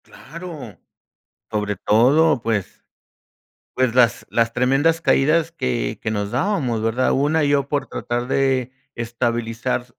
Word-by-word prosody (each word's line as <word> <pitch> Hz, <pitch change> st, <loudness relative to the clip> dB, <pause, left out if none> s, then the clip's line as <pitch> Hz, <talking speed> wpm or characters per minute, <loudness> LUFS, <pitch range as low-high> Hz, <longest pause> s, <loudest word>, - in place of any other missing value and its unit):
Claro, 150 Hz, -, -10 dB, 0.7 s
sobre 105 Hz, -1 st, -2 dB
todo, 130 Hz, -, +3 dB
pues 110 Hz, -5 st, -3 dB, 0.9 s
pues 130 Hz, -2 st, +1 dB
las 120 Hz, -4 st, +3 dB
las 115 Hz, 0 st, +1 dB
tremendas 135 Hz, +7 st, +2 dB
caídas 160 Hz, +4 st, +2 dB
que -, -, -2 dB
que 110 Hz, -, -2 dB
nos 105 Hz, -1 st, -3 dB
dábamos, 145 Hz, -, 0 dB
¿verdad? 115 Hz, +3 st, +1 dB
Una, 150 Hz, +3 st, +1 dB
yo 145 Hz, -1 st, +1 dB
por 140 Hz, -2 st, -2 dB
tratar 120 Hz, +1 st, -3 dB
de 130 Hz, -2 st, 0 dB, 0.2 s
estabilizar 120 Hz, +1 st, -2 dB
125 Hz, 120 wpm, -21 LUFS, 115-145 Hz, 0.9 s, todo